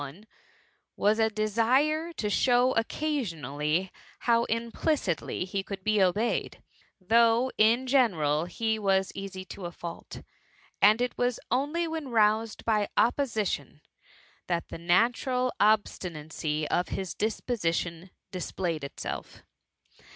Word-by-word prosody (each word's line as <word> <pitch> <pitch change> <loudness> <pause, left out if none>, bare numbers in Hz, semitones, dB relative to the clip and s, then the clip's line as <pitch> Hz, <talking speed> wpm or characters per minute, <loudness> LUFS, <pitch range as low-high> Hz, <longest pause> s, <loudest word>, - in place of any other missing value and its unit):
one,— 145 +9 -9 0.7
was 210 +2 +2
a 220 0 +4
desire 245 +10 +1
to 235 -10 -3
show 245 +4 +3
occasionally 180 - -1 0.3
how 235 -1 +3
im 230 +1 -1
plicitly 215 - -1
he 195 +1 -2
could 195 -1 -7
be 215 0 +2
obeyed: 195 +5 0 0.4
though, 230 +5 +3
in 230 +4 +4
general* 170 - +2
he 220 +4 -1
was 195 -2 +1
easy 190 -1 -7
to 185 -1 -7
a - - -8
fault, 170 -1 -8 0.6
and 215 +4 +6
it 245 - -1
was 245 -1 +1
only 295 +6 0
when 320 -4 -4
roused 220 -1 +2
by 210 -2 +1
opposition, 230 -4 0 0.7
that 170 -1 -2
the - - -7
natural 245 +8 +2
obstinacy 160 -7 0
of 180 - +1
his 190 -2 -4
disposition 180 -6 -2 0.2
displayed 175 -4 -3
itself. 140 - -6
215 Hz, 120 wpm, -28 LUFS, 180-240 Hz, 0.7 s, and